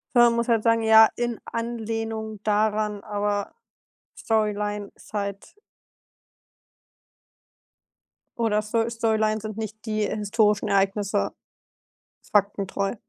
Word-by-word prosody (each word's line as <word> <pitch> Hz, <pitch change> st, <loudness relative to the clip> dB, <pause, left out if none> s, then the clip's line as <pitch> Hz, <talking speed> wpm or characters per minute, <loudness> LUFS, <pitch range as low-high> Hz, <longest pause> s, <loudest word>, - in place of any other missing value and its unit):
Sondern 240 Hz, -1 st, +6 dB
muss 235 Hz, 0 st, 0 dB
halt 230 Hz, -3 st, +2 dB
sagen: 230 Hz, -1 st, +3 dB
„Ja, 220 Hz, 0 st, +8 dB
in 240 Hz, -1 st, -2 dB
Anlehnung 225 Hz, -2 st, -4 dB
daran, 210 Hz, -1 st, 0 dB
aber 205 Hz, -1 st, -2 dB, 0.6 s
Storyline 210 Hz, -2 st, -1 dB
side.“ 200 Hz, -1 st, -6 dB, 2.9 s
Oder 215 Hz, -2 st, +2 dB
Sto 225 Hz, +2 st, 0 dB
Storylines 220 Hz, -2 st, 0 dB
sind 215 Hz, 0 st, -6 dB
nicht 220 Hz, -1 st, -6 dB
die 215 Hz, -1 st, -1 dB
historischen 210 Hz, 0 st, +1 dB
Ereignisse. 200 Hz, +1 st, +1 dB, 1.0 s
Faktentreu. 200 Hz, -1 st, +1 dB
215 Hz, 90 wpm, -25 LUFS, 205-225 Hz, 2.9 s, Ja